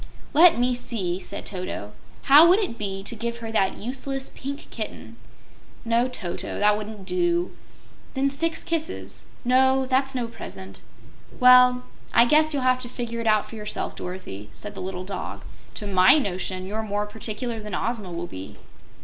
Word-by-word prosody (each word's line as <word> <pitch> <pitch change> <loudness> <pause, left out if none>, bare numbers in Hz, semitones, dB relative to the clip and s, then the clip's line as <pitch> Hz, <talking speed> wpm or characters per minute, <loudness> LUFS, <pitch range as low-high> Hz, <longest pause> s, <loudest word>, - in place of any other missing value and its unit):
"Let 330 +1 +7
me 250 +1 +2
see," 195 -7 -2
said 195 +2 -7
Toto. 180 - -5 0.3
"How 295 +4 +8
would 365 - +6
it 375 - -2
be 195 -2 -3
to 235 +4 -3
give 235 +1 -3
her 225 -1 -6
that 195 -3 +1
useless 270 +3 -3
Pink 280 +2 -6
Kitten?" - - -6 0.7
"No, 235 +2 +2
Toto; 190 -9 -4
that 210 0 +4
wouldn't 210 -2 -7
do." 345 - 0 0.6
"Then 275 +1 +1
six 325 +3 -1
kisses." 330 -2 -4 0.2
"No; 265 +1 +4
that's 265 +1 +1
no 245 -2 -1
present." 95 - -10 0.6
"Well, 250 0 +7 0.3
I 235 - +7
guess 310 +4 +4
you'll 280 -3 -1
have 255 0 +3
to 245 - -5
figure 235 -1 -4
it 230 - -2
out 215 -1 +3
for - - -13
yourself, 210 -1 -4
Dorothy," 145 - -7
said 205 - -7
the - - -7
little 185 0 -5
dog. 195 - -6 0.3
"To 210 - -4
MY 190 +5 +6
notion 185 -6 -2
you're 210 +3 -3
more 205 -1 -2
particular 220 +2 -4
than 210 -3 -5
Ozma 215 -2 -3
will 170 0 -4
be." 95 - -9
230 Hz, 170 wpm, -25 LUFS, 195-260 Hz, 0.7 s, How